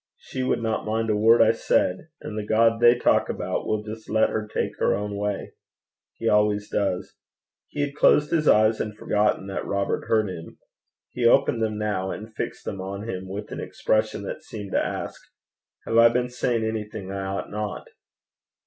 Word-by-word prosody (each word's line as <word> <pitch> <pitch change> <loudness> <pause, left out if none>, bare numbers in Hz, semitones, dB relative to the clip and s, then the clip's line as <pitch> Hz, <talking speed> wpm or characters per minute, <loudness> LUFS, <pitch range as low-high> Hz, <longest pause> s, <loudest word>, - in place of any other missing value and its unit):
She 130 - -6
would 130 -2 0
not 110 -1 -1
mind 110 +1 0
a - - +2
word 115 +3 +6
I - - +5
said. 90 +11 0
And 105 - -6
the 110 - -3
God 115 +2 +3
they 120 0 +7
talk 120 - +2
about - - -3
will 105 -1 -1
just 110 +1 -9
let 110 0 +3
her 110 -1 -2
take - - -2
her - - +2
own 105 0 -4
way. 100 0 -3 0.6
He - - -4
always 105 0 +2
does.' 95 -3 -1 0.5
He 145 - -4
had 145 0 -2
closed 150 0 +4
his 155 -2 +1
eyes 110 +1 +4
and 105 -1 -5
forgotten 105 -2 +1
that 95 0 -4
Robert 100 0 -2
heard 110 -2 +2
him. 85 -3 -8 0.5
He 120 -2 +1
opened 115 0 +3
them 110 -1 -1
now, 105 -3 -1
and 110 +3 -7
fixed - - -5
them 95 - -4
on 100 +3 -6
him 95 -3 -5
with 100 +2 -6
an - - -5
expression 110 -2 -1
that - - -6
seemed 105 -3 -8
to - - +2
ask, - - -5 0.6
'Have 115 - 0
I 115 0 +8
been 125 +1 0
saying 120 -2 -1
anything 105 -3 -4
I 100 0 -3
ought 95 +1 -4
not?' 105 -1 -4
105 Hz, 195 wpm, -25 LUFS, 100-115 Hz, 0.6 s, I